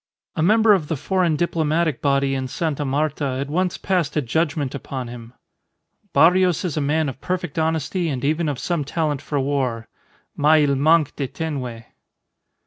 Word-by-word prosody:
A -, -, -1 dB
member 215 Hz, +5 st, +5 dB
of 175 Hz, -7 st, 0 dB
the 160 Hz, -, -2 dB
foreign 180 Hz, +1 st, +1 dB
diplomatic 160 Hz, -2 st, 0 dB
body 140 Hz, -1 st, +2 dB
in 130 Hz, -1 st, -2 dB
Sta. 150 Hz, +1 st, -2 dB
Marta 140 Hz, -1 st, -1 dB
had 140 Hz, +1 st, -4 dB
once 180 Hz, +3 st, 0 dB
passed 175 Hz, -6 st, -1 dB
a -, -, +3 dB
judgment 145 Hz, +1 st, -1 dB
upon 130 Hz, -3 st, -5 dB
him: 120 Hz, 0 st, -10 dB, 0.8 s
"Barrios 180 Hz, +1 st, +4 dB
is 170 Hz, -, -2 dB
a 155 Hz, -, 0 dB
man 150 Hz, +2 st, +1 dB
of 135 Hz, -1 st, -6 dB
perfect 180 Hz, -3 st, -3 dB
honesty 160 Hz, +2 st, -1 dB
and 135 Hz, -2 st, -3 dB
even 155 Hz, +2 st, +1 dB
of 140 Hz, -, -3 dB
some 170 Hz, +1 st, -1 dB
talent 150 Hz, -1 st, -2 dB
for 145 Hz, -, -2 dB
war, 130 Hz, -5 st, -1 dB, 0.5 s
mais 150 Hz, 0 st, +4 dB
il 140 Hz, -, +2 dB
manque 155 Hz, +1 st, +3 dB
de 140 Hz, -, -2 dB
tenue." 130 Hz, -7 st, -5 dB
150 Hz, 170 wpm, -22 LUFS, 140-165 Hz, 0.8 s, member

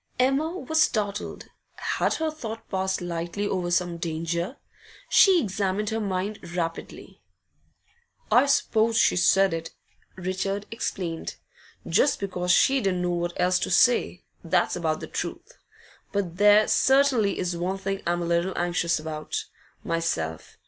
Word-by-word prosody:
Emma 275 Hz, +7 st, +1 dB
was 315 Hz, -1 st, 0 dB
startled. 205 Hz, -8 st, -1 dB, 0.3 s
Had -, -, -1 dB
her 320 Hz, -1 st, -1 dB
thought 225 Hz, -7 st, -7 dB
passed 190 Hz, -1 st, -1 dB
lightly 175 Hz, +3 st, -3 dB
over 180 Hz, -3 st, -2 dB
some 175 Hz, -1 st, 0 dB
danger? 170 Hz, -, -3 dB, 0.5 s
She 380 Hz, -3 st, +6 dB
examined 200 Hz, -, -1 dB
her 225 Hz, -, -1 dB
mind 200 Hz, 0 st, -2 dB, 0.2 s
rapidly. 165 Hz, -2 st, -5 dB, 1.1 s
'I 260 Hz, +3 st, +5 dB
suppose 225 Hz, -4 st, +2 dB
she -, -, +4 dB
said 190 Hz, +1 st, +4 dB
it,' 165 Hz, 0 st, -5 dB, 0.4 s
Richard 190 Hz, +2 st, -3 dB
explained, 180 Hz, -7 st, -4 dB, 0.5 s
'just 290 Hz, -, +2 dB
because 180 Hz, -2 st, -3 dB
she 265 Hz, +8 st, +4 dB
didn't 185 Hz, -3 st, 0 dB
know 175 Hz, -, 0 dB
what 175 Hz, 0 st, -3 dB
else 180 Hz, 0 st, +3 dB
to -, -, -2 dB
say, 240 Hz, -6 st, +3 dB, 0.2 s
that's 175 Hz, +1 st, +1 dB
about 160 Hz, -3 st, -1 dB
the -, -, -6 dB
truth. -, -, -6 dB, 0.5 s
But 190 Hz, -4 st, -2 dB
there 210 Hz, +1 st, +6 dB
certainly 265 Hz, -6 st, +3 dB
is 180 Hz, -1 st, -2 dB
one 180 Hz, +3 st, -2 dB
thing 195 Hz, 0 st, -3 dB
I'm 175 Hz, 0 st, 0 dB
a -, -, -2 dB
little 170 Hz, +2 st, 0 dB
anxious 175 Hz, -1 st, 0 dB
about, 155 Hz, -1 st, -4 dB, 0.4 s
myself. 80 Hz, -, -3 dB
190 Hz, 140 wpm, -25 LUFS, 175-215 Hz, 1.1 s, She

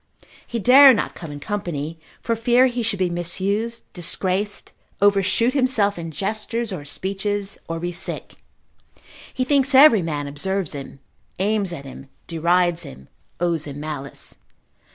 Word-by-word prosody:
He 235 Hz, -, -3 dB
dare 260 Hz, +4 st, +8 dB
not -, -, -2 dB
come 165 Hz, -3 st, -8 dB
in 145 Hz, -, -7 dB
company 165 Hz, -5 st, -4 dB, 0.2 s
for 230 Hz, -, 0 dB
fear 240 Hz, +3 st, +4 dB
he 245 Hz, -1 st, -1 dB
should 225 Hz, -3 st, -1 dB
be 185 Hz, -2 st, 0 dB
misused, 200 Hz, +7 st, -2 dB
disgraced, 190 Hz, +3 st, -2 dB, 0.3 s
overshoot 205 Hz, +4 st, +3 dB
himself 245 Hz, -8 st, +2 dB
in 165 Hz, -1 st, -5 dB
gesture 215 Hz, +7 st, -2 dB
or 160 Hz, -6 st, -6 dB
speeches, 200 Hz, +5 st, -3 dB
or 165 Hz, 0 st, -3 dB
be 175 Hz, +1 st, -3 dB
sick; 170 Hz, -, -6 dB, 1.0 s
he 255 Hz, -, -1 dB
thinks 275 Hz, 0 st, +2 dB
every 265 Hz, -7 st, +8 dB
man 150 Hz, -3 st, -3 dB
observes 180 Hz, +5 st, -3 dB
him, 140 Hz, -1 st, -8 dB, 0.4 s
aims 200 Hz, -1 st, 0 dB
at 140 Hz, -5 st, -7 dB
him, 135 Hz, 0 st, -11 dB, 0.2 s
derides 175 Hz, +1 st, +1 dB
him, 65 Hz, +1 st, -10 dB, 0.3 s
owes 170 Hz, -3 st, -1 dB
him 145 Hz, 0 st, -7 dB
malice. 145 Hz, -2 st, -6 dB
190 Hz, 145 wpm, -22 LUFS, 165-225 Hz, 1.0 s, dare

